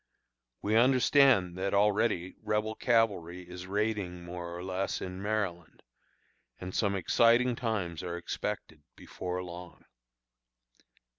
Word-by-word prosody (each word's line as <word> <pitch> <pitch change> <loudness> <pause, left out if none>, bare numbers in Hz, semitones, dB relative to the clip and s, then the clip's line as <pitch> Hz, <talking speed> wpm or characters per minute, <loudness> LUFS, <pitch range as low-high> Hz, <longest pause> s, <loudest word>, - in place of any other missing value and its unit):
We 105 +2 +1
understand 125 -5 +5
that 100 +1 0
already 100 -3 +2
Rebel 105 0 -1
cavalry 100 -8 0
is 90 +1 -8
raiding 100 -3 -2
more 85 0 -6
or 90 - -6
less 95 +1 -2
in 90 +1 -6
Maryland, 100 -5 -3 0.8
and 90 0 -6
some 100 -2 +1
exciting 120 +6 +3
times 100 -9 -2
are 85 -1 -4
expected 80 -2 -5
before 90 0 -5
long. 90 0 -10
95 Hz, 115 wpm, -30 LUFS, 90-110 Hz, 0.8 s, understand